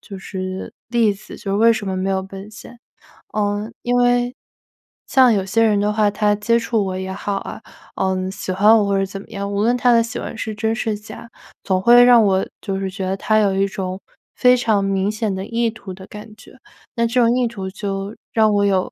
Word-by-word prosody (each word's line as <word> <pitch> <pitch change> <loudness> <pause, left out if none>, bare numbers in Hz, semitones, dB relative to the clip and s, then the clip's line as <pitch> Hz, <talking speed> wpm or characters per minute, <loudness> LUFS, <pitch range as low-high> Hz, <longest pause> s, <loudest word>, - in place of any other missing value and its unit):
就 195 -2 -10
是 185 -1 -6 0.2
例 230 -3 +2
子， 200 - -12
就 200 -3 -5
是 200 - +1
为 230 +2 +5
什 220 -2 -4
么 190 -1 -2
没 190 +1 -1
有 190 0 0
奔 195 +2 -10
现。 235 +2 -13 0.5
呃， 205 0 -1
因 245 0 0
为 245 0 +2 0.7
像 255 -3 +5
有 195 -2 0
些 220 +4 +2
人 215 -2 +3
的 205 +1 +1
话 210 -1 +2
他 210 0 +1
接 220 +3 +1
触 230 -2 0
我 185 -1 -3
也 190 0 -5
好 200 +1 -3
啊， - - -7 0.3
呃， 190 0 -1
喜 195 -1 -5
欢 210 +4 +5
我 210 - +2
或 200 0 +1
者 195 - +1
怎 195 0 -8
么 - - -16
样， 200 -2 -5
无 200 0 -1
论 235 +3 +2
他 245 0 +3
的 230 -1 +5
喜 230 - -6
欢 220 - -6
是 220 -2 -4
真 220 +1 -1
是 220 -2 -2
假， 215 +2 -11 0.3
总 185 -1 0
会 240 +3 +7
让 245 -2 +7
我 190 -2 +2 0.2
就 195 -2 -3
是 195 -1 -3
觉 190 0 -5
得， 190 - -1
他 215 +2 +2
有 200 -2 +2
一 195 +1 +1
种 190 -1 -5 0.4
非 250 0 +5
常 220 -5 +1
明 195 +1 0
显 215 -1 -2
的 190 0 -4
意 230 +1 0
图 215 -4 -9
的 190 +1 -12
感 210 +1 -11
觉， 240 - -17 0.4
那 235 -1 +1
这 245 +2 +1
种 235 0 +3
意 250 - +1
图 195 -5 -6
就 195 +1 -5 0.2
让 220 -2 +3
我 205 0 +2
有 190 -2 +1
205 Hz, 250 characters per minute, -20 LUFS, 195-230 Hz, 0.7 s, 会